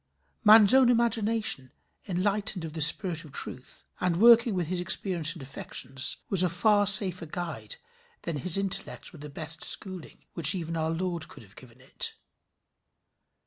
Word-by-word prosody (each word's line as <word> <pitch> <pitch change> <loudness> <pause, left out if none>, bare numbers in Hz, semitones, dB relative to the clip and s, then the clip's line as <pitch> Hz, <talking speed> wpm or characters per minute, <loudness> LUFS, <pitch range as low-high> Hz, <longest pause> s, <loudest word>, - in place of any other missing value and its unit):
Man's 215 0 +7
own 260 -2 +4
imagination 225 - 0 0.4
enlightened 195 -1 -2
of 155 - -9
the 160 - -2
spirit 165 +2 +2
of 155 - -15
truth, 130 -1 -6
and 180 -2 -1
working 230 +1 +5
with 180 -2 -2
his 180 +2 -4
experience 175 -3 -1
and 165 -6 -12
affections, 135 0 -5
was 190 -3 +3
a 180 - +1
far 205 +4 +1
safer 185 -4 +5
guide 175 - -7 0.5
than 165 -3 -4
his 170 +6 +2
intellect 195 -1 -2
with 160 - -15
the 150 - -9
best 160 +3 -6
schooling 185 -5 -3
which 160 0 +2
even 165 -2 -5
our 160 0 -2
Lord 170 0 -4
could - - -14
have 100 -2 -21
given 125 -1 -16
it. 130 - -3
180 Hz, 160 wpm, -26 LUFS, 160-205 Hz, 0.5 s, Man's